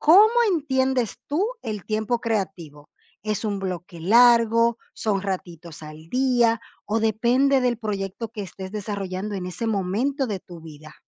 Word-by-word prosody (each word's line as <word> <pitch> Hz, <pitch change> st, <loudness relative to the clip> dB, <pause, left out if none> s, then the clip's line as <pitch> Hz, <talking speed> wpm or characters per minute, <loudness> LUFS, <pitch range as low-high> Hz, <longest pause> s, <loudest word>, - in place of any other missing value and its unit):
¿cómo 410 Hz, +9 st, +7 dB, 0.2 s
entiendes 265 Hz, -, 0 dB
tú 340 Hz, +9 st, +1 dB, 0.2 s
el 215 Hz, -5 st, -5 dB
tiempo 220 Hz, +2 st, 0 dB
creativo? 185 Hz, -10 st, -4 dB, 0.3 s
¿Es 215 Hz, +1 st, -2 dB
un 205 Hz, -2 st, -2 dB
bloque 180 Hz, -2 st, -5 dB
largo, 230 Hz, +3 st, +5 dB, 0.2 s
son 200 Hz, -3 st, -1 dB
ratitos 175 Hz, -4 st, -6 dB
al 155 Hz, +1 st, -11 dB
día 240 Hz, -1 st, +2 dB, 0.3 s
o 215 Hz, +2 st, 0 dB
depende 245 Hz, +5 st, +3 dB
del 245 Hz, -2 st, +1 dB
proyecto 210 Hz, 0 st, -4 dB
que 220 Hz, -3 st, -6 dB
estés 190 Hz, 0 st, -8 dB
desarrollando 200 Hz, -1 st, -4 dB
en 180 Hz, -2 st, -4 dB
ese 180 Hz, +6 st, -4 dB
momento 225 Hz, +8 st, 0 dB
de 205 Hz, -5 st, -4 dB
tu 175 Hz, -2 st, -12 dB
vida? 155 Hz, -1 st, -12 dB
215 Hz, 145 wpm, -24 LUFS, 185-240 Hz, 0.3 s, cómo